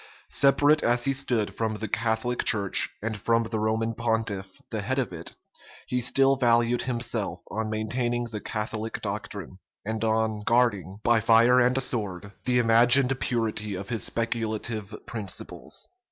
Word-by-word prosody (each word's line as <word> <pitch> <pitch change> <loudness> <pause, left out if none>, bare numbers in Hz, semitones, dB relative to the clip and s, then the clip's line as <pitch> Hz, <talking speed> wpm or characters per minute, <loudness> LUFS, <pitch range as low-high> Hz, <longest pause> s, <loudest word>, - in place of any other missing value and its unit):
Separate 145 +2 +4
as 120 +1 +2
he 135 - +2
stood 125 -6 0
from 110 -1 -2
the 110 +1 -4
Catholic 115 +3 0
church, 100 -5 +2
and 110 0 -2
from 115 +2 +1
the 110 -1 -3
Roman 110 +1 0
pontiff, 110 -5 -2
the 110 - -2
head 130 +7 -2
of 125 -8 -1
it, 85 0 -6 0.5
he 125 0 -1
still 135 +2 +3
valued 120 -1 +3
himself 120 -4 -2
on 110 0 -2
maintaining 120 +3 -1
the 110 -3 -6
Catholic 110 +1 -4
doctrine, 100 -2 -5 0.3
and 110 +1 -3
or 110 -1 +1
guarding, 105 -6 +1
by 120 -1 +4
fire 115 +3 +5
and 125 +1 +3
sword, 100 -6 -3
the 125 -1 +2
imagined 120 +3 +5
purity 110 -4 -1
of 100 +2 -6
his 115 -2 -2
speculative 110 -2 -2
principles. 105 -5 -6
115 Hz, 150 wpm, -26 LUFS, 105-120 Hz, 0.5 s, fire